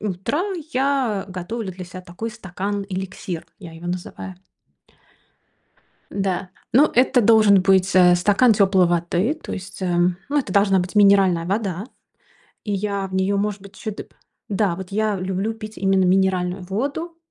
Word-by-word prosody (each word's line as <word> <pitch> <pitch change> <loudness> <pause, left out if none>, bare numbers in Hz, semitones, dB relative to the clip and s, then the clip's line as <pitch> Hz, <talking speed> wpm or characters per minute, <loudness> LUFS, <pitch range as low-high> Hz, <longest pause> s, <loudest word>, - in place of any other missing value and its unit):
утро, 205 - -2 0.3
я 260 -6 0
готовлю 190 +4 -5
для 185 0 -8
себя 185 +1 -9
такой 185 +6 -6
стакан-эликсир, 190 -3 -5
я 175 - -9
его 165 +2 -10
называю. 180 +1 -5 1.8
Да, 190 -1 -2 0.2
ну, 280 +6 +6
это 250 +1 +4
должен 215 -4 +5
быть, 190 -1 +3
э, 180 -1 +7
стакан 205 +7 +4
тёплой 195 -3 +4
воды. 175 - 0
То - - -6
есть, 190 0 -7
ам, 175 0 +1
ну, 290 +1 +1
это 230 -9 -3
должна 200 -1 +4
быть 180 +2 -3
минеральная 195 -4 +4
вода. 195 -1 -2 0.8
И 205 - -2
я 200 0 -2
в 190 - -12
неё, 190 +1 +1
может 205 0 -2
быть, 200 0 -14
чу 215 - -5
дыб 205 - -10 0.4
Да, 200 -3 +1
вот 190 +1 -8
я 215 0 0
люблю 190 +4 -2
пить 215 -1 -10
именно 195 -1 +2
минеральную 185 0 +1
воду. 280 - -4
195 Hz, 155 wpm, -22 LUFS, 185-210 Hz, 1.8 s, э